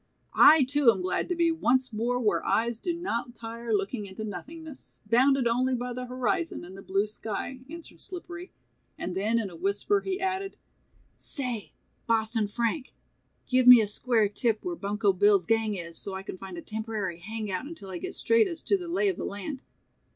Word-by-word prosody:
"I 305 -2 +8
too 275 0 +4
am 190 -5 +2
glad 185 - -1
to 355 - 0
be 335 -1 +3
once 260 -6 +1
more 235 +3 0
where 225 -4 +2
one's - - -3
eyes 230 0 +1
do 350 - -1
not 335 -9 -3
tire 230 0 -6
looking 205 +1 -1
into 190 +3 -7
nothingness, 305 - -8
bounded 255 +3 +4
only 255 +2 +2
by 245 0 -3
the 250 +1 -5
horizon 255 - -1
and 185 +2 -11
the 195 - -9
blue 195 +1 +1
sky," 215 +4 -5
answered 335 +1 -9
Slippery, 355 -1 -7 0.5
and 185 - -4
then 215 +4 +1
in 210 -5 -2
a - - -10
whisper, 200 - +1
he 385 -1 -3
added: 380 +1 -2 0.6
"Say, 250 -7 -4 0.3
Boston 225 -1 +1
Frank, 235 +6 -2 0.5
give 255 -1 +2
me 250 -1 +12
a 220 - +3
square 220 +1 +1
tip 220 - -1
where 355 -1 -2
Bunko 205 - +1
Bill's 200 -1 +4
gang 225 0 +1
is, 170 -2 -6
so 195 - -5
I 190 - -5
can 185 - -7
find 190 -2 -8
a 170 - -7
temporary 215 -5 -4
hangout 215 +3 -4
until 245 - -9
I 180 - -5
get - - -6
straight 460 -2 +3
as 335 -3 -5
to 400 - +2
the 355 - -6
lay 365 +4 +1
of 385 - 0
the - - -4
land." 255 +7 -5
230 Hz, 195 wpm, -28 LUFS, 205-290 Hz, 0.6 s, me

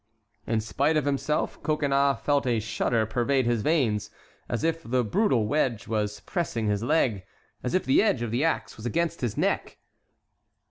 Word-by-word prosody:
In 115 -1 +1
spite 140 +8 +1
of 150 - 0
himself, 145 +2 -1
Coconnas 140 -3 +1
felt 145 -2 +1
a 120 -2 +2
shudder 110 +1 0
pervade 125 +4 +1
his 120 -2 +1
veins, 120 -9 +1 0.4
as 120 - -2
if 165 0 0
the 125 0 0
brutal 120 - +2
wedge 120 -3 0
was 105 -2 -2
pressing 170 - -2
his 105 -1 0
leg—as 125 - -2
if 185 - +1
the 130 - +4
edge 200 - +1
of 115 - -3
the 120 +5 0
axe 165 - -1
was 110 +2 -5
against 170 +4 -1
his 120 -5 -2
neck. - - -1
125 Hz, 170 wpm, -26 LUFS, 115-150 Hz, 0.4 s, the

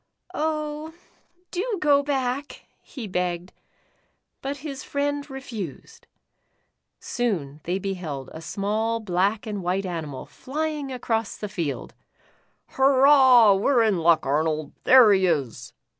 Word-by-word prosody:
" - - -56
Oh, 305 0 -3 0.6
do 410 +4 -2
go 290 -2 +4
back," 275 -1 -3 0.2
he 250 -5 -8
begged, 180 -1 -3 0.9
but 275 +1 -4
his 275 -3 -6
friend 285 +1 -2
refused. 230 - -8 0.9
Soon 160 - -3
they 180 +2 -1
beheld 180 -9 -5
a 160 - -8
small 215 +6 -1
black 200 +2 0
and 210 -3 -4
white 185 +2 -1
animal 160 -7 -5
flying 300 0 -4
across 225 -4 -2
the 210 - -5
field. 170 -7 -4 0.4
" - - -41
Hurrah, 265 -4 +6
we 195 +8 +1
're 240 -4 +4
in 210 -5 +2
luck, 165 -2 +3
Arnold. 155 +2 -1
There 250 -5 +8
he 190 -1 +3
is. 140 -9 -2
220 Hz, 130 wpm, -24 LUFS, 180-275 Hz, 0.9 s, There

